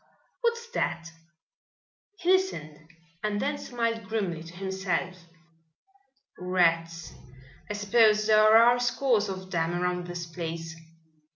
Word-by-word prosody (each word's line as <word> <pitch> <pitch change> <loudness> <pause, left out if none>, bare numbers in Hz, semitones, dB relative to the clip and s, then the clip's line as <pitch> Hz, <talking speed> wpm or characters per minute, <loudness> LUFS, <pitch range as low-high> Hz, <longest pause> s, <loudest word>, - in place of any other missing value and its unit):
What's 470 -1 -1
that?" 170 - -2 1.1
He 360 0 +1
listened 155 - -1 0.3
and 210 -1 -1
then 285 +3 -2
smiled 230 -3 -3
grimly 195 -7 -2
to 165 +1 -12
himself. 185 -2 -3 1.1
"Rats. 165 -2 0 0.6
I - - -2
suppose 215 +1 +3
there 215 0 +6
are 240 +2 +5
scores 245 -3 +1
of 185 0 -7
them 165 0 0
around 180 0 -2
this 175 -1 -5
place. 165 -1 -6
190 Hz, 110 wpm, -27 LUFS, 170-225 Hz, 1.1 s, there